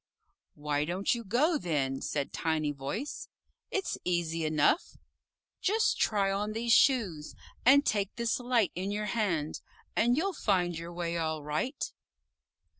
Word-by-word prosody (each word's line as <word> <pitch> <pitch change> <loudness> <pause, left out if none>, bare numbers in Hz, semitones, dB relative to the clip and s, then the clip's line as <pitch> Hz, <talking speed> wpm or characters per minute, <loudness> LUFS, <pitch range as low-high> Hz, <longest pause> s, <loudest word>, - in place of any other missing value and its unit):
"Why 145 0 -1
don't 180 +8 0
you 235 -1 -4
go, 285 - +2
then?" 135 - -1
said 140 -2 -2
Tiny 155 -2 0
Voice. 145 - -5 0.4
"It's 390 - -2
easy 165 -2 0
enough. 155 - +2 0.6
Just 435 +3 +2
try 200 -2 +2
on 205 +2 -1
these 230 +1 +1
Shoes, 200 - +3 0.3
and 285 +2 +7
take 200 -2 0
this 235 0 0
Light 245 -7 +2
in 185 +3 -3
your 210 +1 -2
hand, 185 -9 -1 0.3
and 240 +3 +3
you'll 385 +5 0
find 180 - +1
your 165 +1 -6
way 170 -1 -3
all 160 -2 -2
right." 155 - -2
190 Hz, 140 wpm, -30 LUFS, 160-235 Hz, 0.6 s, and